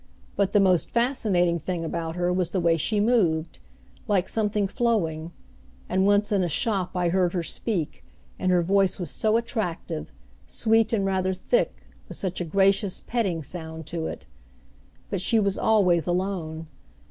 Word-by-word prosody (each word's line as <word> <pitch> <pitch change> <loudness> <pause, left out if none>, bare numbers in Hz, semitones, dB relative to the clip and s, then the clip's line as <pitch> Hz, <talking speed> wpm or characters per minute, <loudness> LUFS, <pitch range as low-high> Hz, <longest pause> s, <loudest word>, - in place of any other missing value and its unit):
But 200 -2 +1
the 205 - +4
most 185 -3 +3
fascinating 210 -9 +1
thing 170 +1 -3
about 165 0 -3
her 180 0 0
was 180 -2 0
the 185 - -1
way 170 -1 +3
she 205 +7 0
moved, 180 -8 +1 0.5
like 190 -3 +1
something 210 -2 0
flowing; 175 -9 -1 0.6
and 190 +1 +2
once 205 +1 +3
in 200 -2 +2
a 175 - -1
shop 190 +3 -1
I 175 -1 +1
heard 180 0 +1
her 175 -2 -1
speak, 175 -2 -3 0.4
and 185 - +1
her 175 -1 +3
voice 195 +1 +2
was 175 - -3
so 220 +1 +2
attractive, 180 -8 -3 0.4
sweet 225 -1 +2
and 205 -4 +1
rather 190 -1 0
thick, - - 0 0.3
with - - -7
such 185 -2 -3
a - - -2
gracious, 195 +2 +2
petting 195 -9 -1
sound 160 0 -7
to 165 -2 -2
it! - - -7 0.9
But 190 - -1
she 225 +3 +3
was 200 -2 +1
always 180 -7 +3
alone. 175 -3 -2
185 Hz, 165 wpm, -25 LUFS, 170-205 Hz, 0.9 s, the